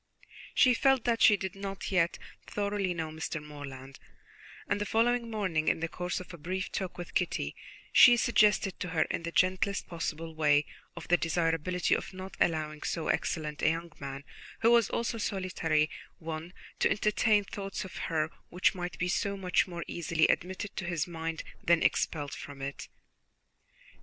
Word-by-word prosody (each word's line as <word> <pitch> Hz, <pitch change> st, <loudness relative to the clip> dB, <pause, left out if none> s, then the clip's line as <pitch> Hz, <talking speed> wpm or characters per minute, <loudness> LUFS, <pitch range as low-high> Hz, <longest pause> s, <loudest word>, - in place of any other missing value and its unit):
She 255 Hz, -, +6 dB
felt 270 Hz, 0 st, +3 dB
that 235 Hz, -1 st, +1 dB
she 210 Hz, -, +7 dB
did 190 Hz, -1 st, -4 dB
not 195 Hz, 0 st, -5 dB
yet 170 Hz, -3 st, +2 dB, 0.3 s
thoroughly 200 Hz, -2 st, -1 dB
know 165 Hz, -2 st, -3 dB
Mr. 160 Hz, 0 st, -4 dB
Morland; 140 Hz, -3 st, -9 dB, 0.7 s
and 205 Hz, 0 st, 0 dB
the -, -, 0 dB
following 235 Hz, +2 st, +2 dB
morning, 185 Hz, -8 st, -1 dB
in -, -, +3 dB
the 165 Hz, -, -1 dB
course 180 Hz, +2 st, -3 dB
of 185 Hz, -, -10 dB
a 170 Hz, -, -9 dB
brief 185 Hz, +4 st, -3 dB
talk 185 Hz, -2 st, -4 dB
with 175 Hz, -1 st, -7 dB
Kitty, 120 Hz, -, -1 dB, 0.4 s
she 245 Hz, -1 st, +9 dB
suggested 210 Hz, -5 st, +3 dB
to -, -, -3 dB
her 160 Hz, -2 st, +2 dB
in -, -, -2 dB
the 170 Hz, 0 st, -4 dB
gentlest 185 Hz, +3 st, +1 dB
possible 165 Hz, -1 st, -4 dB
way 150 Hz, -2 st, +3 dB, 0.3 s
of 170 Hz, -, -8 dB
the 175 Hz, -, +5 dB
desirability 165 Hz, +1 st, +1 dB
of -, -, -5 dB
not 185 Hz, 0 st, -8 dB
allowing 155 Hz, -2 st, 0 dB
so 165 Hz, -, -2 dB
excellent 150 Hz, -2 st, -1 dB
a -, -, +4 dB
young 165 Hz, +1 st, -3 dB
man, 140 Hz, 0 st, -6 dB, 0.4 s
who 230 Hz, -, +5 dB
was 235 Hz, -3 st, +5 dB
also 235 Hz, 0 st, -1 dB
a -, -, -6 dB
solitary 175 Hz, -6 st, 0 dB, 0.3 s
one, 160 Hz, +1 st, -6 dB, 0.3 s
to -, -, +4 dB
entertain 210 Hz, 0 st, +3 dB
thoughts 195 Hz, 0 st, -5 dB
of 185 Hz, -, -9 dB
her 160 Hz, -1 st, 0 dB, 0.2 s
which 180 Hz, +1 st, +2 dB
might 180 Hz, -1 st, -5 dB
be 180 Hz, -, 0 dB
so 200 Hz, +2 st, 0 dB
much 185 Hz, 0 st, +2 dB
more 170 Hz, -2 st, -5 dB
easily 165 Hz, -1 st, +1 dB
admitted 190 Hz, +3 st, -1 dB
to 185 Hz, -, -3 dB
his 170 Hz, -3 st, -1 dB
mind 165 Hz, -2 st, -4 dB, 0.2 s
than 170 Hz, -1 st, +4 dB
expelled 145 Hz, -3 st, 0 dB
from 145 Hz, -1 st, -8 dB
it. 140 Hz, +1 st, -5 dB
175 Hz, 175 wpm, -30 LUFS, 160-195 Hz, 0.7 s, she